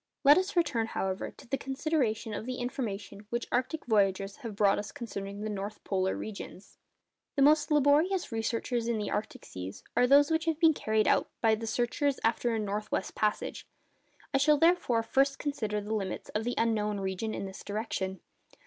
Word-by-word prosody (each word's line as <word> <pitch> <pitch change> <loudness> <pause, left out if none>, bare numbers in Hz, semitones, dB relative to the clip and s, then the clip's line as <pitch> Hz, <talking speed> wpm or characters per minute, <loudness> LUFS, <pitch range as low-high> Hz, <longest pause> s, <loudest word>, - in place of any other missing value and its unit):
Let 290 +4 +8
us 375 +1 -3
return, 240 -10 +1
however, 190 -3 -2
to - - -16
the 270 +3 -1
consideration 265 -6 -1
of 220 - -5
the 255 - -2
information 215 -5 -5
which 235 +1 -2
arctic 255 +6 -1
voyagers 195 -3 +1
have 230 -7 -7
brought 200 -1 +3
us 205 - -6
concerning 200 -3 -6
the 215 - -3
north 205 +1 -5
polar 190 -1 0
regions. 205 -2 -8 0.6
The 280 - +4
most 300 +1 +5
laborious 300 +5 +3
researches 230 +1 -1
in 235 -2 0
arctic 215 +1 -3
seas 95 +1 -8
are 250 - +4
those 285 +3 +6
which 320 0 +1
have 325 -2 0
been 325 -2 +6
carried 220 -5 +1
out - - +3
by 225 -1 +4
the 225 +1 -2
searchers 250 +5 0
after 230 +1 +1
a - - 0
north 210 0 -3
west - - -1
passage. 210 -1 -1 0.7
I 270 - +3
shall 300 +2 +5
therefore 325 -8 +3
first 275 +4 +2
consider 220 -8 -2
the 210 +2 -4
limits 195 -4 -3
of 215 +1 -2
the 245 - -1
unknown 210 -3 +1
region 195 +3 -3
in - - -4
this 190 0 -8
direction. 200 -3 -3
225 Hz, 185 wpm, -30 LUFS, 205-275 Hz, 0.7 s, Let